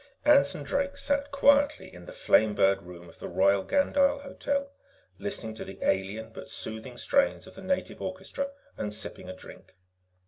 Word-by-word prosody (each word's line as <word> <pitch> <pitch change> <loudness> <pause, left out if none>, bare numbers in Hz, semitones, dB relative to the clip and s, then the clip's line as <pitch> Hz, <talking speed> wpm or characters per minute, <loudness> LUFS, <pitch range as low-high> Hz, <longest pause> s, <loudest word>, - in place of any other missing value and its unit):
_ - - -4
Anson 290 -1 +5
Drake 280 0 -1
sat 285 0 0
quietly 285 +1 +3
in - - -12
the - - -8
Flamebird 105 - +3
Room 85 -1 -11
of 85 - -17
the - - -6
Royal 100 +1 +3
Gandyll 280 0 +2
Hotel, 280 0 -2 0.5
listening 155 - -4
to 110 - -7
the 95 - -9
alien, 100 +4 -1
but - - -9
soothing 110 +3 -7
strains 280 - +2
of 190 - -13
the 195 - -11
native 185 -1 -2
orchestra 190 +9 -4 0.3
and 105 - -3
sipping 100 -3 -6
a 95 - -6
drink. 95 - -14
190 Hz, 170 wpm, -28 LUFS, -, 0.5 s, Anson